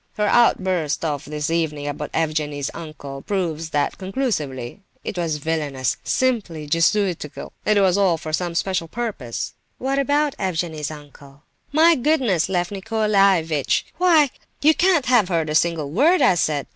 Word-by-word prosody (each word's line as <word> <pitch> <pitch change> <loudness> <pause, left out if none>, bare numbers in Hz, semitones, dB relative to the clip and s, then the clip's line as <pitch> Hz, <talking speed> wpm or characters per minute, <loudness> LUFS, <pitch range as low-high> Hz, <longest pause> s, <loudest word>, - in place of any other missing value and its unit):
Her 210 - 0
outburst 185 -10 +2
of 145 -3 -2
this 150 +1 -3
evening 150 -3 -1
about 145 +1 -4
Evgenie's 150 -3 -1
uncle 145 -4 -8
proves 165 -5 -2
that 145 -2 -1
conclusively. 185 - -3 0.2
It - - -5
was 165 -4 -1
villainous, 145 -4 -2
simply 210 -12 -1
jesuitical, 165 0 0
and 215 - +4
it 200 - +4
was 190 +1 +3
all 185 -4 +3
for 155 -1 -7
some 175 +1 -1
special 180 -1 -1
purpose." 180 - -4 0.2
"What 270 +2 -1
about 290 +1 +1
Evgenie's 165 -5 -2
uncle?" 145 -1 -13 0.3
"My 320 +3 +6
goodness, 250 - +1
Lef 175 -1 -1
Nicolaievitch, 195 -7 +1
why, 325 -7 +4 0.3
you 310 +2 +6
can't 340 -3 +2
have 240 -7 +3
heard 165 -3 0
a - - -1
single 160 -3 +1
word 310 - +4
I - - +6
said! 155 -4 0
170 Hz, 150 wpm, -22 LUFS, 150-215 Hz, 0.3 s, My